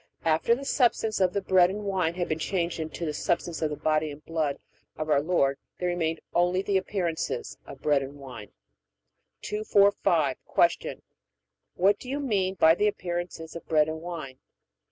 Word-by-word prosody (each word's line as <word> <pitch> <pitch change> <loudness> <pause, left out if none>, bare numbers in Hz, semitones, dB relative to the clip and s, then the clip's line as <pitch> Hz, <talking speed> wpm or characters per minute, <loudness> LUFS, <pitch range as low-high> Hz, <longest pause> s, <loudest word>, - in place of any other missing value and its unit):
After 165 +8 +3
the 275 +3 -7
substance 230 -5 +2
of 180 -1 +3
the 200 - -1
bread 180 -2 +5
and 205 +2 -5
wine 185 -4 0
had 175 -1 -2
been 155 - -2
changed 170 0 -1
into 160 +2 -4
the 155 - -2
substance 170 +2 -1
of 155 - +1
the 150 - -3
body 155 +1 +1
and 145 +1 -10
blood 155 -4 -1 0.4
of 155 0 -2
our 140 -1 +4
Lord 140 -4 +1 0.2
there 180 - -1
remained 165 -2 -1
only 180 +2 +2
the 200 - -1
appearances 185 -4 -3
of - - -11
bread 145 -2 +3
and 135 +1 -7
wine. 130 -7 -10 0.9
245. 205 -1 +2 0.4
Q. - - -7 0.7
What 195 +3 +3
do 255 - -9
you 280 +2 -2
mean 195 -9 0
by 160 -3 +6
the 210 +5 +2
appearances 175 -4 -4
of 170 - -8
bread 155 -1 +3
and 160 0 -4
wine? 160 -7 -7
170 Hz, 175 wpm, -27 LUFS, 155-190 Hz, 0.9 s, by